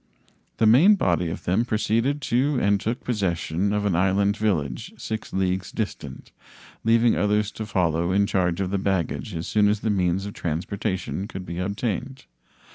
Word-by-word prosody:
The 115 - +3
main 145 - +7
body 90 - +1
of 80 - -6
them 95 +6 +1
proceeded 120 +5 0
to 135 +4 +1
and 100 -3 +2
took 115 +4 -3
possession 95 -4 -1
of 105 0 0
an 100 - +1
inland 95 +3 +2
village 85 -12 -1
6 110 -1 -5
leagues 95 0 -1
distant, 110 -3 -5 0.5
leaving 115 +1 +4
others 105 0 +1
to 110 - -6
follow 85 -4 +1
in 100 +2 +3
charge 90 -3 0
of 95 -1 -2
the 100 - 0
baggage 90 -3 -2
as 80 +1 -4
soon 105 -1 +3
as 105 0 0
the 110 - 0
means 95 -1 0
of 100 - -6
transportation 95 +4 -3
could 95 -4 -7
be 85 +1 -5
obtained. 105 +7 -3
100 Hz, 170 wpm, -24 LUFS, 90-110 Hz, 0.5 s, main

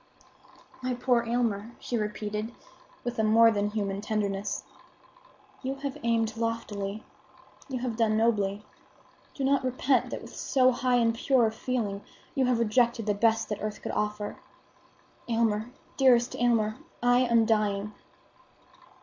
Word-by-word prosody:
"My 255 0 -1
poor 245 -1 +2
Aylmer," 230 -2 -1
she 245 - -4
repeated, 210 +1 -3 0.5
with 245 -1 -4
a - - +3
more 225 +1 +6
than 205 -1 0
human 200 -2 -2
tenderness, 205 -2 -2 1.0
"you 265 +1 -3
have 275 0 -5
aimed 225 -1 +1
loftily; 220 -3 -3 0.7
you 260 - -2
have 240 -3 -3
done 220 -2 +2
nobly. 210 -3 +1 0.7
Do 275 - -3
not 275 0 +2
repent 255 +1 +1
that - - -5
with - - -11
so 255 -1 +3
high 250 0 +1
and 230 -1 +3
pure 245 +1 +3
a 220 - +1
feeling, 220 -4 -2 0.3
you 265 - +2
have 250 -1 +2
rejected 235 0 +2
the 210 - +2
best 225 +2 +2
the 210 - -3
earth 215 0 -4
could - - -3
offer. 210 0 -2 0.9
Aylmer, 225 -1 +1 0.3
dearest 250 -3 +4
Aylmer, 230 -2 +1 0.3
I 245 0 +5
am 235 -3 +4
dying!" 210 -2 0
230 Hz, 140 wpm, -28 LUFS, 210-245 Hz, 1.0 s, more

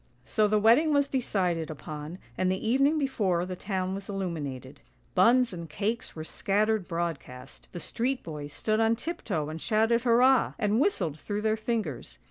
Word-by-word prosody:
So 215 -1 +2
the 215 +1 +2
wedding 240 +9 +5
was 285 -1 +3
decided 180 - -1
upon, 155 +2 -7 0.2
and 185 +5 +1
the 190 +4 -2
evening 275 +6 +3
before 205 - 0
the 185 0 -5
town 185 0 -2
was 195 +1 -7
illuminated. 145 -9 -5 0.3
Buns 235 +5 +4
and 170 -2 -7
cakes 220 +9 -3
were 155 - -5
scattered 210 +4 0
broad 170 -3 -2
cast; 125 +1 -13
the 175 - -6
street 255 +8 -2
boys 150 -3 -7
stood 215 +8 0
on 225 0 +3
tiptoe 225 - -3
and 160 +1 -6
shouted 225 +2 +2
hurrah, 250 +2 +4
and 210 0 +1
whistled 180 - 0
through 205 +4 -4
their 220 0 +2
fingers. 215 - -3
200 Hz, 170 wpm, -28 LUFS, 165-230 Hz, 0.3 s, wedding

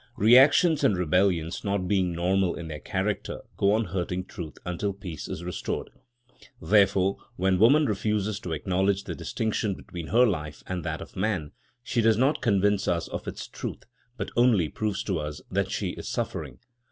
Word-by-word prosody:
Reactions 135 - +6
and 100 - +3
rebellions, 90 -1 +1
not 100 -2 -1
being 95 -2 +1
normal 90 +2 +1
in 85 -2 -7
their 75 -1 -6
character, - - -3
go 100 +1 +3
on 110 +1 +1
hurting 90 0 -3
truth 80 -5 -8
until 95 +3 -2
peace 90 -4 -7
is 85 - -5
restored. 90 0 -4 0.7
Therefore, 95 +1 +3 0.2
when 95 -2 +1
woman 140 +8 +6
refuses 105 -1 -1
to 85 - -5
acknowledge 95 +5 0
the - - -5
distinction 110 -2 -2
between 85 -3 -8
her 120 +7 +5
life 75 -8 -3
and 90 -2 -4
that - - -3
of - - -10
man, 95 -7 -1 0.3
she 120 -1 0
does 110 -1 +4
not 140 +5 +2
convince 100 -2 +2
us 85 -1 0
of - - -6
its - - -5
truth, - - -6 0.3
but - - -4
only 115 -10 +4
proves 105 -2 -2
to 95 -5 -1
us 75 0 -5
that - - 0
she - - -2
is - - -7
suffering. - - -3
95 Hz, 175 wpm, -27 LUFS, 90-110 Hz, 0.7 s, Reactions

